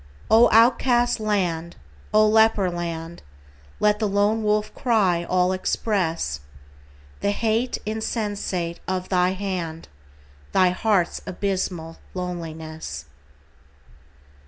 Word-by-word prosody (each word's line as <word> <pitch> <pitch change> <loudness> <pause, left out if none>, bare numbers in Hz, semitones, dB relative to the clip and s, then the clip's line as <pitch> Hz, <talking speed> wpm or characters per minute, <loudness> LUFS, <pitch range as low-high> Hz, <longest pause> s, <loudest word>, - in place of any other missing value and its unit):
O 230 +2 +7
outcast 240 +1 +4
land! 180 -6 -1 0.4
O 215 0 +5
leper 220 -3 +4
land! 170 -1 -5 0.6
Let 210 0 +3
the 215 - +1
lone 205 +2 +2
wolf 210 0 0
cry 200 -9 +2
all 180 +1 +1
express 180 - -1 0.8
The - - 0
hate 225 +4 0
insensate 205 -5 -3
of 185 0 -2
thy 180 0 +2
hand, 180 -5 -4 0.6
Thy 185 -1 +5
heart's 190 -2 +1
abysmal 185 -4 -3 0.2
loneliness. 160 - -6
190 Hz, 95 wpm, -23 LUFS, 170-215 Hz, 0.8 s, O